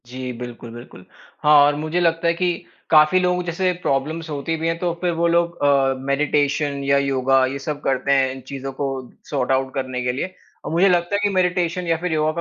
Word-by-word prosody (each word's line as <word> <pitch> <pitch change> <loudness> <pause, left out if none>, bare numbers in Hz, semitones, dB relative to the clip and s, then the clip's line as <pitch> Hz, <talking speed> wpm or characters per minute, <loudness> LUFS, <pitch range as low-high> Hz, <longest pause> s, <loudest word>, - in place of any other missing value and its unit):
जी। 130 +1 -6
बिल्कुल, 120 -1 -8
बिल्कुल। 120 -6 -12 0.4
हाँ, 150 0 +6
और 145 0 +2
मुझे 155 +4 -2
लगता 165 0 +1
है 170 - +3
कि 175 +1 0 0.4
काफ़ी 155 +3 +5
लोगों 180 0 0
जैसे 180 +2 0
प्रॉब्लम्स 155 +4 -2
होती 150 +2 -3
भी 160 +1 -2
हैं 165 0 0
तो 175 -1 -1
फिर 180 -1 +1
वो 170 +1 +1
लोग 170 0 +1
अ, 135 -2 +3
मेडिटेशन 140 +1 0
या 140 0 +3
योगा, 135 -1 +2
ये 135 +2 -4
सब 145 +1 -5
करते 135 0 0
हैं 135 -1 +3
इन 130 0 -8
चीज़ों 135 0 -5
को 140 - 0 0.4
सॉर्ट 135 -3 -1
आउट 130 0 0
करने 130 -2 -3
के 125 - 0
लिए। 145 +9 -4 0.3
और - - -4
मुझे 175 +4 +4
लगता 175 +2 +1
है - - +1
कि 205 - +3
मेडिटेशन 180 -1 0
या 165 -1 +2
फिर 180 +1 -3
योगा 155 0 +1
150 Hz, 220 wpm, -21 LUFS, 135-170 Hz, 0.4 s, हाँ